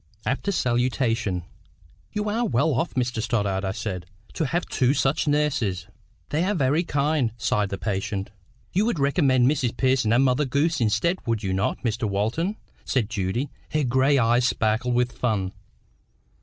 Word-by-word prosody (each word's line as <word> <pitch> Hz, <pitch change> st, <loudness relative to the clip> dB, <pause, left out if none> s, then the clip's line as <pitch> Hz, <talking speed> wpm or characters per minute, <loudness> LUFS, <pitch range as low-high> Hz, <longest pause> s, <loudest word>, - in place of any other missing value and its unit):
After 140 Hz, +10 st, -1 dB
salutation,— 120 Hz, -, 0 dB, 0.7 s
"You 210 Hz, 0 st, -2 dB
are 225 Hz, +3 st, 0 dB
well 150 Hz, -, +2 dB
off, 135 Hz, +8 st, -1 dB
Mr 125 Hz, -2 st, 0 dB
Stoddart," 105 Hz, -4 st, 0 dB
I 95 Hz, -, -1 dB
said, 95 Hz, -3 st, -5 dB, 0.3 s
"to 160 Hz, -, -1 dB
have 175 Hz, +5 st, -1 dB
two 130 Hz, +2 st, +1 dB
such 140 Hz, +3 st, +1 dB
nurses." 135 Hz, -11 st, 0 dB, 0.4 s
"They 155 Hz, +3 st, 0 dB
are 205 Hz, +2 st, 0 dB
very 145 Hz, +2 st, +2 dB
kind," 145 Hz, -6 st, 0 dB
sighed 105 Hz, -3 st, 0 dB
the 100 Hz, -, -3 dB
patient 100 Hz, +1 st, -3 dB, 0.4 s
"You 200 Hz, +5 st, +2 dB
would 235 Hz, -, 0 dB
recommend 140 Hz, -3 st, +3 dB
Mrs 130 Hz, -4 st, 0 dB
Pearson 130 Hz, -4 st, +2 dB
and 120 Hz, +3 st, +4 dB
Mother 135 Hz, +3 st, +2 dB
Goose 145 Hz, +4 st, +1 dB
instead, 115 Hz, -, +1 dB
would 115 Hz, -1 st, 0 dB
you 95 Hz, -1 st, -1 dB
not, 95 Hz, +2 st, -1 dB
Mr 115 Hz, -2 st, -1 dB
Walton?" 110 Hz, -, -1 dB, 0.3 s
said 115 Hz, -5 st, -1 dB
Judy, 115 Hz, +6 st, -2 dB, 0.2 s
her 155 Hz, -1 st, +2 dB
gray 130 Hz, +2 st, +3 dB
eyes 120 Hz, 0 st, +3 dB
sparkling 115 Hz, +2 st, 0 dB
with 125 Hz, 0 st, +2 dB
fun. 105 Hz, -7 st, -1 dB
125 Hz, 160 wpm, -24 LUFS, 110-145 Hz, 0.7 s, and